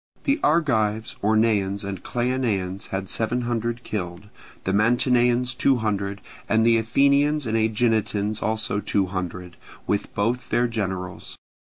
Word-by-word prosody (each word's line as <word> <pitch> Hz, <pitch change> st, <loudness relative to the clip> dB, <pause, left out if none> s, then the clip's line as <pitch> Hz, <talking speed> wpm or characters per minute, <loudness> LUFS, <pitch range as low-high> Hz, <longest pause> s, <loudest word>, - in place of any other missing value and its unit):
The 280 Hz, +2 st, +1 dB
Argives, 110 Hz, -9 st, +1 dB
Orneans, 105 Hz, -2 st, +2 dB
and 100 Hz, -2 st, -5 dB
Cleonaeans 115 Hz, -7 st, -1 dB
had 95 Hz, 0 st, -4 dB
seven 115 Hz, +5 st, -1 dB
hundred 120 Hz, 0 st, -2 dB
killed; 90 Hz, 0 st, -5 dB, 0.3 s
the 95 Hz, -, -1 dB
Mantineans 120 Hz, +2 st, +3 dB
two 135 Hz, +1 st, +3 dB
hundred, 100 Hz, -3 st, -2 dB, 0.3 s
and 110 Hz, +1 st, +3 dB
the 115 Hz, -1 st, +5 dB
Athenians 140 Hz, +5 st, +2 dB
and 110 Hz, -1 st, -1 dB
Aeginetans 110 Hz, -2 st, +1 dB
also 110 Hz, -2 st, 0 dB
two 100 Hz, -1 st, 0 dB
hundred, 90 Hz, -1 st, -5 dB, 0.3 s
with 100 Hz, -, -1 dB
both 115 Hz, +5 st, -1 dB
their 120 Hz, +1 st, +2 dB
generals. 95 Hz, -5 st, -4 dB
110 Hz, 130 wpm, -24 LUFS, 100-120 Hz, 0.3 s, the